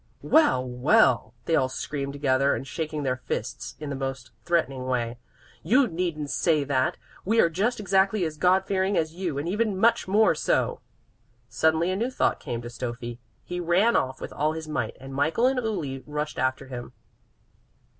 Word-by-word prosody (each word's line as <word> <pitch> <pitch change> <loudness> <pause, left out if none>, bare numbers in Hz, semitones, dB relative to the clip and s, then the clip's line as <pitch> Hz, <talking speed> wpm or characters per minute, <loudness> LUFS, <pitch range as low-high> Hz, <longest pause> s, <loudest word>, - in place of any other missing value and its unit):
"Well, 295 - +4
well," 125 - +3
they 165 - +2
all 130 -4 +2
screamed 140 +1 -4
together, 140 -1 +2
and - - -5
shaking 155 +1 -4
their 130 -1 0
fists - - -4
in 150 -2 -5
the - - -2
most 135 -3 -5
threatening 135 -7 0
way. 120 -2 -1 0.4
"You 260 +4 +4
needn't 165 -5 -3
say 155 -4 +2
that. 130 -2 0 0.3
We 225 +4 +2
are 170 - +4
just 215 +8 0
exactly 195 0 +2
as 155 -1 -4
God 180 +4 +3
fearing 195 0 0
as 160 -1 0
you, 175 -5 -3
and 145 +4 -3
even 210 +1 0
much 230 +2 +3
more 210 +1 +4
so!" 155 - 0 0.7
Suddenly 160 +3 +2
a - - 0
new 230 +6 -1
thought 260 - 0
came 120 0 -5
to - - -6
Stöffi. 120 0 -6 0.2
He 180 0 -5
ran 180 +7 +3
off 130 0 0
with - - -7
all 150 +2 0
his 160 -1 -6
might, 155 - -3
and 135 +1 -9
Michael 160 - +1
and 260 0 +3
Uli 150 - -3
rushed 150 +1 -3
after 130 +1 0
him. 125 -2 -8
155 Hz, 180 wpm, -26 LUFS, 130-190 Hz, 0.7 s, Well